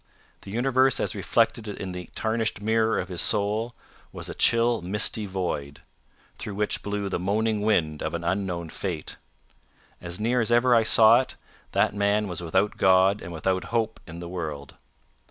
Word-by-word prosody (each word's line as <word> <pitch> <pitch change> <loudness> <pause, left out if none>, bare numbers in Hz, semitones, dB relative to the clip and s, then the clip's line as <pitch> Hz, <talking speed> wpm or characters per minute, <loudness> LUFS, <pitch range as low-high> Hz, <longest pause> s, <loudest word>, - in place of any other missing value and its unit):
The - - -11
universe 130 +4 +2
as - - 0
reflected 110 -2 0
in 100 -2 -5
the 90 -1 -7
tarnished 110 -1 -1
mirror 110 +1 +1
of 95 - -3
his 90 -3 0
soul, 110 +3 +1 0.4
was - - -6
a - - -5
chill 115 -1 +3
misty 105 +3 -1
void, 85 -7 -4 0.6
through 105 - -6
which 105 +1 -1
blew 100 -1 -3
the 95 - -2
moaning 105 +3 0
wind 85 -8 +1
of 80 +2 -3
an 85 - -4
unknown 90 -2 -2
fate. 85 -2 -5 0.8
As 85 +2 -5
near 120 +3 +1
as 115 - -1
ever 120 +1 +4
I 115 - +6
saw 110 +1 +6
it, 130 - -7 0.4
that - - +2
man 100 +1 +1
was 90 -2 -5
without 95 +5 0
God 95 +2 +4
and 85 - -8
without 95 +2 -1
hope 115 +1 -1
in 80 0 -9
the 85 0 -7
world. 80 -6 -6
100 Hz, 170 wpm, -25 LUFS, 90-110 Hz, 0.8 s, I